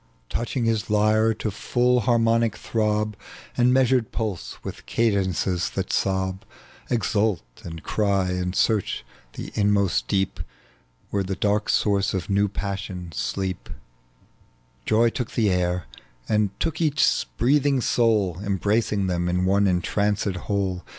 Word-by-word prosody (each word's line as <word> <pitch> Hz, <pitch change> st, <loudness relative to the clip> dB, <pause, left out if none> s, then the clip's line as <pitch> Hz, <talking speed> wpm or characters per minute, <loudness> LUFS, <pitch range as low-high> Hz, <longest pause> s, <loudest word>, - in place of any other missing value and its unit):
Touching 120 Hz, +1 st, -2 dB
his 110 Hz, -2 st, 0 dB
lyre 110 Hz, +1 st, +3 dB
to 110 Hz, -, -3 dB
iiill 125 Hz, +4 st, +1 dB
harmonic 115 Hz, -2 st, +3 dB
throb 105 Hz, -1 st, 0 dB, 0.4 s
And 125 Hz, 0 st, +4 dB
measured 130 Hz, -2 st, +3 dB
pulse, 105 Hz, -6 st, -4 dB
with -, -, -7 dB
eadences 95 Hz, -5 st, 0 dB
that -, -, -3 dB
sob, 95 Hz, 0 st, 0 dB, 0.5 s
Exuit 105 Hz, -, +1 dB, 0.2 s
and 80 Hz, -1 st, -8 dB
cry, 100 Hz, -3 st, +1 dB
and 90 Hz, 0 st, -2 dB
search 110 Hz, -2 st, +1 dB, 0.3 s
the -, -, -7 dB
inmost 100 Hz, -, +1 dB
deep 95 Hz, -1 st, 0 dB, 0.7 s
Where 100 Hz, -, +1 dB
the 95 Hz, 0 st, -3 dB
dark 105 Hz, +2 st, 0 dB
sources 100 Hz, -2 st, +2 dB
of 95 Hz, +1 st, -3 dB
new 100 Hz, +1 st, +3 dB
passion 95 Hz, -3 st, -5 dB
sleep, 95 Hz, +3 st, -3 dB, 1.2 s
Joy 115 Hz, +2 st, +4 dB
took 125 Hz, -1 st, -4 dB
the 110 Hz, -4 st, +2 dB
air, 90 Hz, -2 st, 0 dB, 0.4 s
and 105 Hz, -1 st, +2 dB
took 160 Hz, +1 st, -2 dB
each 155 Hz, -2 st, +2 dB
breathing 140 Hz, +2 st, +3 dB
soui, 105 Hz, -7 st, +1 dB
Embracing 100 Hz, +1 st, 0 dB
them 90 Hz, -1 st, 0 dB
in 90 Hz, +1 st, +1 dB
one 100 Hz, +1 st, +3 dB
entranced 100 Hz, +3 st, 0 dB
whole. 95 Hz, -1 st, -2 dB
105 Hz, 130 wpm, -24 LUFS, 95-115 Hz, 1.2 s, And